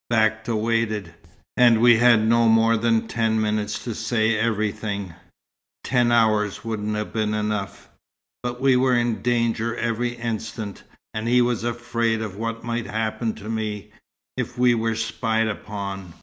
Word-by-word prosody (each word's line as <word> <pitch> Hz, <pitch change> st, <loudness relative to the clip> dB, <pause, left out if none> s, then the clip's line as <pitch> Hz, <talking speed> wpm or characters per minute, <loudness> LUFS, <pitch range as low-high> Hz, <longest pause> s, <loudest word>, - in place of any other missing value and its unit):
Bakta 110 Hz, 0 st, +1 dB
waited 110 Hz, -5 st, -1 dB, 0.4 s
and 120 Hz, -2 st, +5 dB
we 120 Hz, 0 st, +6 dB
had 115 Hz, -2 st, +5 dB
no 115 Hz, 0 st, +4 dB
more 115 Hz, 0 st, +4 dB
than 115 Hz, 0 st, +1 dB
ten 110 Hz, -1 st, 0 dB
minutes 105 Hz, -1 st, -1 dB
to 120 Hz, -, -4 dB
say 110 Hz, 0 st, 0 dB
everything. 105 Hz, -3 st, -2 dB, 0.7 s
Ten 120 Hz, -2 st, +2 dB
hours 110 Hz, -3 st, +2 dB
wouldn't 105 Hz, -1 st, -2 dB
have 105 Hz, 0 st, -4 dB
been 110 Hz, -1 st, 0 dB
enough! 105 Hz, -2 st, -3 dB, 0.5 s
but 125 Hz, 0 st, -4 dB
we 135 Hz, -1 st, +4 dB
were 125 Hz, 0 st, +3 dB
in 120 Hz, -2 st, 0 dB
danger 115 Hz, -1 st, 0 dB
every 120 Hz, +1 st, -1 dB
instant, 110 Hz, -3 st, -5 dB, 0.3 s
and 110 Hz, +1 st, -3 dB
he 125 Hz, +1 st, +4 dB
was 120 Hz, -2 st, -1 dB
afraid 115 Hz, -1 st, -1 dB
of 105 Hz, -3 st, -6 dB
what 115 Hz, +2 st, -4 dB
might 120 Hz, -2 st, -3 dB
happen 110 Hz, +2 st, -2 dB
to 105 Hz, -, -10 dB
me, 105 Hz, -2 st, -4 dB, 0.5 s
if 125 Hz, -2 st, -4 dB
we 125 Hz, -1 st, +4 dB
were 115 Hz, -1 st, 0 dB
spied 115 Hz, 0 st, -1 dB
upon. 100 Hz, -4 st, -6 dB
115 Hz, 150 wpm, -23 LUFS, 110-115 Hz, 0.7 s, we